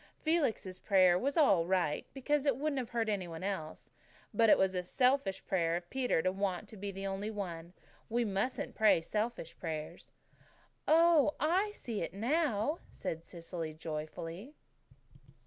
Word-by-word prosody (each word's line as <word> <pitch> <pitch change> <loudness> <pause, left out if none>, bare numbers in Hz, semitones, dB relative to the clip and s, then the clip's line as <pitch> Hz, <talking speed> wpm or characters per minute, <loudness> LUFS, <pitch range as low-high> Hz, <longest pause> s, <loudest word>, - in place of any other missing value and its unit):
"Felix's 275 - 0
prayer 185 -3 +5
was 280 - -1
all 195 - +4
right, 175 -5 0
because 290 +2 0
it 270 -4 +3
wouldn't 290 -1 -1
have 245 -2 -4
hurt 230 -2 -1
any 200 -4 -1
one 165 +1 -7
else; 190 -6 -4 0.4
but 225 -1 +4
it - - +7
was 190 0 +2 0.2
selfish 255 -6 +2
of 175 -1 0
Peter 250 -11 +1
to 185 - +2
want 195 0 -2
to 220 - -12
be 200 0 -5
the 195 +1 -6
only 195 +2 -3
one. 175 -5 -5 0.4
We 235 +1 +1
mustn't 200 +5 -2
pray 215 -6 +4
selfish 210 -1 -3
prayers." 155 -3 -5 0.8
"Oh, 325 -2 +5
I 365 +7 +2
see 230 -3 -5
through 170 - 0
it 165 - -10
now," 265 - +1
said 165 0 -5
Cecily 165 -2 -6
joyfully. 165 - -6
200 Hz, 155 wpm, -33 LUFS, 175-260 Hz, 0.8 s, it